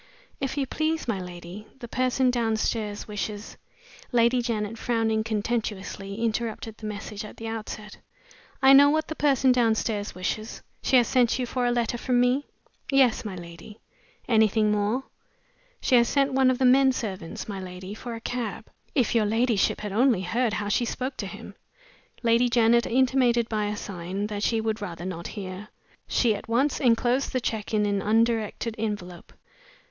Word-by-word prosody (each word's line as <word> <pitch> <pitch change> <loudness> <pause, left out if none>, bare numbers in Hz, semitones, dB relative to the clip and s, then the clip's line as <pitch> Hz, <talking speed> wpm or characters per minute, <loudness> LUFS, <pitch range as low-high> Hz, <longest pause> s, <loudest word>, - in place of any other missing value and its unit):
"If 270 0 -3
you 275 - +1
please, 315 +3 -1
my 215 -5 -1
lady, 180 +3 -9
the 245 -3 -8
person 255 +1 +1
downstairs 220 -3 -1
wishes 210 0 -5 0.3
" 485 - -21
Lady 240 0 +3
Janet, 225 -2 -3
frowning 225 -2 0
contemptuously, 210 -3 -3
interrupted 225 -1 -2
the 215 - -6
message 210 0 -6
at 210 - -10
the 225 - -6
outset. 215 -2 -6 0.6
"I 265 +1 +8
know 285 +1 +8
what 310 +1 0
the 315 - -4
person 270 -4 +3
downstairs 220 -4 +1
wishes. 215 +4 -4 0.2
She 265 - +2
has 240 - +4
sent 250 -3 +3
you 255 - -1
for 245 0 -1
a - - +2
letter 240 0 0
from 250 -1 +1
me?" 250 +3 +2 0.4
"Yes, 265 -4 +4
my 205 -4 -5
lady." 175 +5 -11 0.5
"Anything 220 -2 +3
more?" 210 +5 0 0.8
"She - - 0
has 235 0 +4
sent 275 -1 +2
one 265 -1 +4
of 255 - +1
the 260 - +2
men 265 +1 +6
servants, 195 -9 -5
my 200 -2 -5
lady, 185 +1 -7
for 235 +2 -6
a 225 - -8
cab. 230 -3 -4 0.2
If 250 -6 +2
your 220 -3 +3
ladyship 225 -1 +1
had 210 -1 -4
only 230 -1 +3
heard 230 +4 0
how 205 -1 -2
she 210 +4 +1
spoke 255 +3 -3
to - - -4
him!" - - -9 0.7
Lady 235 +1 +3
Janet 235 0 +4
intimated 250 -2 +3
by 215 -2 -1
a 205 0 -3
sign 190 +1 -4
that 205 -1 -4
she 225 +1 +1
would 220 0 -2
rather 175 -3 -6
not 170 -2 -5
hear. 195 0 -7 0.4
She 235 -3 +2
at 210 - -7
once 265 +6 +1
inclosed 245 +1 +2
the 255 - +1
check 220 -3 -3
in 210 -1 +2
an 200 -1 0
undirected 225 +1 +1
envelope. 195 -5 -5
225 Hz, 175 wpm, -26 LUFS, 210-245 Hz, 0.8 s, I